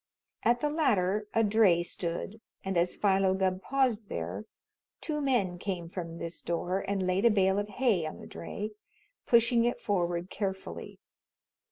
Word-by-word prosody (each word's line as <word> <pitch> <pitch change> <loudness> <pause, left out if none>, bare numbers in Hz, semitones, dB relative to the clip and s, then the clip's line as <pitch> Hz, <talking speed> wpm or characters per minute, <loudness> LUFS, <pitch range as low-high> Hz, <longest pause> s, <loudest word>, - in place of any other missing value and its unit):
At 240 +1 +2
the 295 - +1
latter 210 - +1
a 225 - +4
dray 205 -5 +4
stood, 175 +5 -4 0.2
and 190 0 -1
as 175 +1 +2
Philo 195 -2 +3
Gubb 190 -1 0
paused 245 -6 0
there, 85 +5 -4 0.5
two 300 -2 -3
men 215 -11 +1
came 175 -4 -4
from 170 -3 -5
this 170 0 -5
door 175 +2 -1
and 195 -1 -1
laid 185 +2 +1
a - - +8
bale 195 -2 +3
of 205 0 -3
hay 210 -7 +1
on 155 - -7
the - - -10
dray, 210 +5 -6 0.6
pushing 235 0 +5
it 240 +1 0
forward 175 -3 -1
carefully. 190 -2 -4
195 Hz, 160 wpm, -30 LUFS, 175-225 Hz, 0.6 s, a